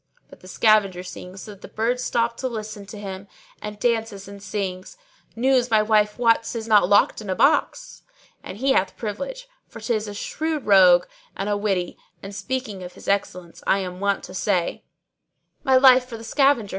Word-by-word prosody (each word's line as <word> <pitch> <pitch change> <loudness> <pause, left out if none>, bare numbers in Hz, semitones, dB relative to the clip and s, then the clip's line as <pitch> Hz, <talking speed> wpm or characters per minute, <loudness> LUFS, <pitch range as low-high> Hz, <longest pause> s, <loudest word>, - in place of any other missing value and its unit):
But - - -14
the 185 - -15
scavenger 195 -3 +2
sings 185 +1 -9
so 215 - -9
that 200 -1 -14
the - - -9
birds 245 +3 -1
stop 235 -1 0
to 260 - -2
listen 215 -3 -7
to 210 - -9
him 195 -1 -7 0.3
and 210 0 -7
dances 225 -3 -1
and 200 0 -11
sings, 190 - -5 0.4
'News 250 +1 +2
my 215 -1 +4
wife 210 -1 +2
wots 230 0 +2
is 225 -1 -5
not 205 -4 +4
locked 205 +2 +3
in 210 - -8
a 185 - 0
box!'[FN#624] - - -1
And 190 - -7
he 265 +4 +1
hath 195 -7 +1
privilege, - - -5 0.2
for - - -11
'tis 220 -3 -2
a 205 - -7
shrewd 310 +6 -3
rogue[FN#625] 185 -3 +6 0.3
and 195 +2 -3
a 205 - +1
witty; 195 -4 -2 0.2
and 195 +1 -8
speaking 210 -1 -4
of 180 0 -9
his - - -14
excellence 180 -3 -2
I - - +4
am 180 -2 -5
wont 200 0 0
to 185 - -10
say, 185 -2 -1 0.8
My 265 -3 +3
life 255 -1 +6
for 235 -2 -8
the 225 - -11
scavenger! 270 -3 +2
210 Hz, 195 wpm, -23 LUFS, 195-240 Hz, 0.8 s, rogue[FN#625